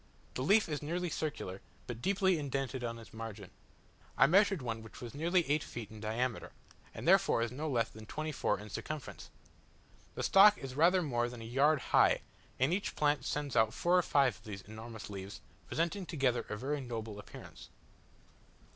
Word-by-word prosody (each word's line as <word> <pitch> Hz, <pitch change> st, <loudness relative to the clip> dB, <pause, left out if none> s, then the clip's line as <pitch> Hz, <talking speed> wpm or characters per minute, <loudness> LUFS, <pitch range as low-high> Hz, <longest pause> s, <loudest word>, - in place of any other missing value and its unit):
The -, -, -3 dB
leaf 200 Hz, +10 st, +4 dB
is 150 Hz, -3 st, -3 dB
nearly 170 Hz, +3 st, -2 dB
circular, 100 Hz, -11 st, -4 dB, 0.2 s
but 120 Hz, -1 st, -6 dB
deeply 190 Hz, -1 st, +2 dB
indented 135 Hz, -2 st, -3 dB
on 115 Hz, -1 st, -3 dB
its 115 Hz, -, -13 dB
margin. 110 Hz, -4 st, -7 dB, 0.7 s
I -, -, +7 dB
measured 195 Hz, 0 st, +4 dB
one 115 Hz, -2 st, -3 dB
which 110 Hz, -, -12 dB
was 120 Hz, -2 st, -8 dB
nearly 170 Hz, +3 st, +1 dB
eight 150 Hz, +2 st, +1 dB
feet 110 Hz, -4 st, -7 dB
in 110 Hz, -, -10 dB
diameter, 115 Hz, +3 st, -2 dB, 0.4 s
and -, -, -7 dB
therefore 115 Hz, 0 st, +4 dB
no 150 Hz, +6 st, -4 dB
less 115 Hz, -4 st, +1 dB
than 110 Hz, 0 st, -12 dB
twenty 155 Hz, +4 st, -3 dB
four 140 Hz, -, 0 dB
in 105 Hz, 0 st, -10 dB
circumference! 155 Hz, +5 st, -6 dB, 0.9 s
The -, -, -3 dB
stalk 205 Hz, +2 st, +7 dB
is 135 Hz, -1 st, -7 dB
rather 175 Hz, +6 st, +4 dB
more 120 Hz, -5 st, 0 dB
than 120 Hz, -2 st, -9 dB
a -, -, -7 dB
yard 140 Hz, +6 st, +3 dB
high, -, -, +5 dB, 0.4 s
and 135 Hz, +6 st, +3 dB
each 200 Hz, +2 st, -2 dB
plant 145 Hz, -3 st, +1 dB
sends 145 Hz, -3 st, -2 dB
out 110 Hz, +2 st, +3 dB
four 175 Hz, +1 st, +2 dB
or 180 Hz, -, +6 dB
five 140 Hz, -7 st, +2 dB
of -, -, -22 dB
these 100 Hz, -3 st, -7 dB
enormous 110 Hz, +1 st, -9 dB
leaves, 100 Hz, 0 st, -7 dB, 0.3 s
presenting 170 Hz, +3 st, -1 dB
together 130 Hz, -6 st, 0 dB
a 105 Hz, -, -3 dB
very 140 Hz, +5 st, -2 dB
noble 110 Hz, -4 st, -5 dB
appearance. 105 Hz, -, -11 dB
130 Hz, 180 wpm, -33 LUFS, 115-155 Hz, 0.9 s, I